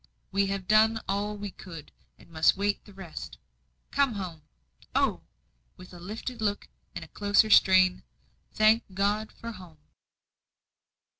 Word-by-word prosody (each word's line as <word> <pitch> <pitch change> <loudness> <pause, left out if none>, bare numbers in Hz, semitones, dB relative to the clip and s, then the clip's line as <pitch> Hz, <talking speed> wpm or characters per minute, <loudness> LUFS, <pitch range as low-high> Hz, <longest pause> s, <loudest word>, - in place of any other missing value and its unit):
"We 200 0 +1
have 195 -2 -4
done 220 +2 +4
all 205 +2 -2
we 205 -1 -6
could 165 -6 -11 0.3
and - - -19
must 160 +3 +3
wait 200 +1 -1
the 205 - -15
rest. 190 -4 -9 0.5
Come 280 -4 +2
home. 180 -6 -6 0.5
Oh!" - - +1 0.6
with 180 0 -13
a 175 - -11
lifted 220 +6 -6
look 205 -1 -1 0.3
and - - -6
a - - -16
closer 205 +1 +2
strain, 185 -2 +5 0.5
"thank 215 +2 +4
God 205 +2 0
for 230 - -8
home!" 180 -7 -13
200 Hz, 140 wpm, -28 LUFS, 185-215 Hz, 0.6 s, strain